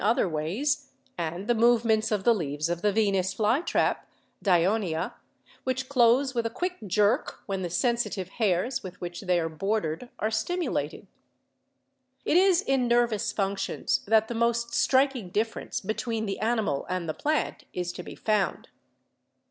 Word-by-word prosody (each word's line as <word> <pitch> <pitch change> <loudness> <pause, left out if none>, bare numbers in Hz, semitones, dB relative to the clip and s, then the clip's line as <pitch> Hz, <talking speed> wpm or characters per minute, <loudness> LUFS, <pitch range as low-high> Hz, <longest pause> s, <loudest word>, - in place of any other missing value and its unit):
other 215 -1 +3
ways, 210 - -1 0.3
and 170 +3 -4
the 240 - +4
movements 225 -1 +3
of 205 -3 0
the 235 - +5
leaves 155 -5 -2
of 175 0 -2
the 210 - +2
Venus 195 -3 +1
lytrap 235 +10 +2 0.5
(Dionea), 180 -2 +1 0.5
which 260 0 -2
close 260 +1 +4
with 235 -2 0
a 230 - -1
quick 360 +10 -3
jerk 210 - +1
when 195 -2 -3
the 175 - -3
sensitive 225 -1 0
hairs 215 +4 +1
with 180 -1 -9
which 175 0 -6
they 180 -3 +2
are 165 - -1
bordered 195 +4 -2
are 215 - 0
stimu 340 +11 -1
lated. - - -3 1.2
It - - +2
is 375 0 +5
in 265 -5 +1
nervous 235 -3 +2
functions 195 -1 -1
that 220 +1 +4
the 240 - -4
most 235 0 0
striking 260 -6 +2
differ 220 +4 -1
n6 - - -9
BIOLOGY - - -17
ence - - -3
between 220 +2 -2
the 195 -2 -3
animal 220 -10 0
and 180 -2 -2
the 155 - -1
plant 305 - -1
is 180 -1 -3
to 180 - -7
be - - -9
found. 210 -2 -1
220 Hz, 165 wpm, -27 LUFS, 185-240 Hz, 1.2 s, the